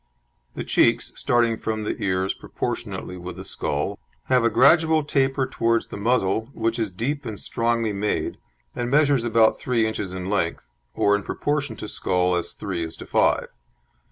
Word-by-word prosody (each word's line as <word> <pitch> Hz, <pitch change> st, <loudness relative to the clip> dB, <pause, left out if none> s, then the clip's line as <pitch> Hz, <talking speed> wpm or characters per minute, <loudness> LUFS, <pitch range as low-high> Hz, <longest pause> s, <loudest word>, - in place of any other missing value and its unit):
The -, -, -3 dB
cheeks, -, -, +2 dB
starting 120 Hz, -2 st, +2 dB
from 110 Hz, -1 st, -2 dB
the 105 Hz, -, -2 dB
ears 95 Hz, 0 st, 0 dB
proportionately 90 Hz, -, -5 dB
with 90 Hz, 0 st, -7 dB
the 95 Hz, -, -8 dB
skull, 75 Hz, -6 st, -3 dB, 0.3 s
have 125 Hz, -2 st, +4 dB
a 115 Hz, -, +4 dB
gradual 160 Hz, +3 st, +5 dB
taper 135 Hz, -2 st, +1 dB
towards 115 Hz, -3 st, 0 dB
the -, -, -7 dB
muzzle, 110 Hz, 0 st, +1 dB
which 115 Hz, +1 st, -1 dB
is 110 Hz, -2 st, 0 dB
deep 135 Hz, +11 st, -3 dB
and 110 Hz, -5 st, -5 dB
strongly 115 Hz, -2 st, 0 dB
made, 100 Hz, +1 st, -2 dB, 0.4 s
and 120 Hz, 0 st, -2 dB
measures 140 Hz, -2 st, +3 dB
about 115 Hz, -1 st, +3 dB
three 120 Hz, -3 st, +1 dB
inches 105 Hz, -4 st, -3 dB
in 95 Hz, 0 st, -5 dB
length, 85 Hz, -10 st, -1 dB, 0.2 s
or 100 Hz, 0 st, +3 dB
in 100 Hz, -, -1 dB
proportion 140 Hz, +2 st, -2 dB
to 105 Hz, -, -7 dB
skull 90 Hz, -3 st, 0 dB
as 85 Hz, -1 st, -1 dB
three 90 Hz, -4 st, -3 dB
is 80 Hz, -, -6 dB
to -, -, -9 dB
five. -, -, +2 dB
110 Hz, 170 wpm, -24 LUFS, 95-125 Hz, 0.4 s, gradual